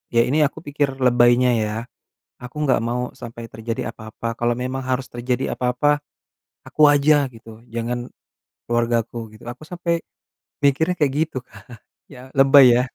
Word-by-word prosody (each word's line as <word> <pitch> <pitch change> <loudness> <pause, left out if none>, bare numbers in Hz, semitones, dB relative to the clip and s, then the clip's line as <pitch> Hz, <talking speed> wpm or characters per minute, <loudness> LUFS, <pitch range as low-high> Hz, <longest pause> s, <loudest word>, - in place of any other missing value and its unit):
ya 115 - +6
ini 150 +4 +2
aku - - -11
pikir 145 -2 -1
lebainya 125 -1 +4
ya, 105 0 -3 0.7
aku 125 +3 -10
gak 130 - +3
mau 125 +1 -2
sampai 115 0 -9
terjadi 115 +1 -4
apa-apa, 110 +1 -9
kalo 120 0 +1
memang 130 +2 -3
harus 130 0 -1
terjadi 125 +2 -2
apa-apa, 130 +4 +1 0.7
aku - - -3
aja 145 0 +4
gitu, 115 0 -14
jangan 120 +1 -3 0.6
keluargaku 120 0 0 0.2
gitu. 110 - -16
Aku 125 +5 -12
sampai 170 0 -2 0.6
mikirnya 160 +6 +2
kayak 145 -4 +2 0.2
gitu, 135 - -5
Kak, 100 -4 -17 0.5
ya, 130 0 -12
lebai, 135 0 +8
ya. 125 - +2
125 Hz, 150 wpm, -21 LUFS, 120-140 Hz, 0.7 s, lebai